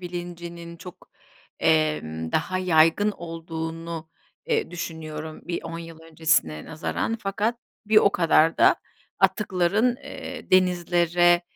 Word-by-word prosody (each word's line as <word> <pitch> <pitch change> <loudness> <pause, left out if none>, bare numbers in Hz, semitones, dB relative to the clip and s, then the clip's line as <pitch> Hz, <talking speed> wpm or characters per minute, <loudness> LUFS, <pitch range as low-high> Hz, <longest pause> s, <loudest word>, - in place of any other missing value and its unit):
bilincinin 170 -1 -7
çok, 180 +1 -13 0.5
emm, 150 - +1
daha 185 0 0
yaygın 175 +3 +4
olduğunu, 165 -1 -6 0.4
eee, 460 -2 0
düşünüyorum 160 -2 -6
bir 170 - -3
10 165 0 -6
yıl 165 -1 -10
öncesine 160 - 0
nazaran. 170 +7 -2
Fakat 205 +4 -1 0.3
bir 215 - +2
o 200 - +7
kadar 165 -1 +3
da - - +6 0.4
atıkların, 210 +4 +2
eee, 265 -1 -9
denizlere, 175 -1 +3
170 Hz, 110 wpm, -25 LUFS, 160-185 Hz, 0.5 s, o